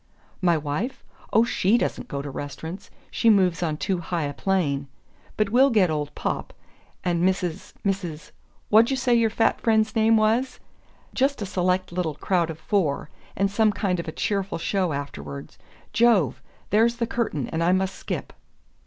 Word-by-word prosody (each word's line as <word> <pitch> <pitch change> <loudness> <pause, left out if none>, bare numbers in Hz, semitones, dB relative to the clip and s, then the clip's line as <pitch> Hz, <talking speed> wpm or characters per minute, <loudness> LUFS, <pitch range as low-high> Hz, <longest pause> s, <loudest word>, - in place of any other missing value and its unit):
"My 175 -3 +3
wife? 155 - -3 0.3
Oh, 225 - +5
SHE 225 -1 +2
doesn't - - -2
go 140 0 -4
to 140 - -6
restaurants 160 +7 -7 0.2
she 230 - +3
moves 185 -5 +3
on 155 -3 -1
too 185 +3 -1
high 170 -1 -2
a 145 0 -3
plane. 145 -7 0 0.5
But 210 -2 +1
we'll 260 +4 +5
get 200 -8 +3
old 150 -1 -3
Popp, - - -3 0.5
and 175 -1 0
Mrs., 185 -1 -1
Mrs., 180 -6 -3 0.4
what'd 220 +2 +6
you 270 - 0
say 250 -1 +2
your 230 -1 +4
fat 225 +1 +1
friend's 220 -1 +2
name 225 0 +4
was? 230 +4 +1 0.5
Just 270 -3 +1
a - - -2
select 185 -1 0
little 175 -4 -2
crowd 170 +1 0
of 160 - -5
four 155 -4 -1 0.2
and 195 +1 +1
some 215 +1 +3
kind 195 -3 -1
of 170 - -5
a - - -3
cheerful 195 +2 -2
show 185 +1 0
afterward... 75 - -6 0.4
Jove! 215 - +3 0.3
There's 225 +3 +4
the 235 0 -1
curtain, 220 - -2
and 165 +1 -1
I 175 - +3
must 190 +1 +1
skip." - - -5
190 Hz, 170 wpm, -25 LUFS, 160-220 Hz, 0.5 s, what'd